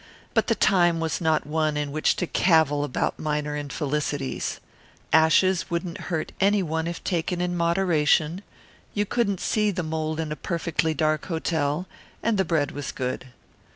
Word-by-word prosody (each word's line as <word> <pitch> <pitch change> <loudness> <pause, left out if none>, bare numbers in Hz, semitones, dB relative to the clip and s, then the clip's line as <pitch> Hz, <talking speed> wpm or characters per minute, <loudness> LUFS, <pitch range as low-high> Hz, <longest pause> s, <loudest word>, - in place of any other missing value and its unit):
But - - +2
the - - +2
time 175 -4 +3
was 165 +2 -2
not 160 -1 +2
one 155 0 0
in 145 -1 -2
which 155 +2 +2
to 180 - -1
cavil 160 -5 +3
about 145 - -2
minor 150 -1 -2
infelicities. 145 -1 -2 0.5
Ashes 170 +3 +4
wouldn't 170 +1 -4
hurt 160 -3 -2
any 200 0 +3
one 160 0 -2
if 170 0 -5
taken 175 0 -1
in 175 0 -1
moderation; 170 -1 +2 0.5
you 205 0 +1
couldn't 200 -3 0
see 210 -1 +1
the 180 -3 -2
mould 155 0 -2
in 160 -2 -3
a - - -2
perfectly 165 -1 -1
dark 155 -1 0
hotel; 160 -1 -1 0.4
and 220 -3 +1
the 190 - +3
bread 155 -4 +1
was 145 -1 -5
good. 130 0 -4
160 Hz, 160 wpm, -25 LUFS, 150-180 Hz, 0.5 s, Ashes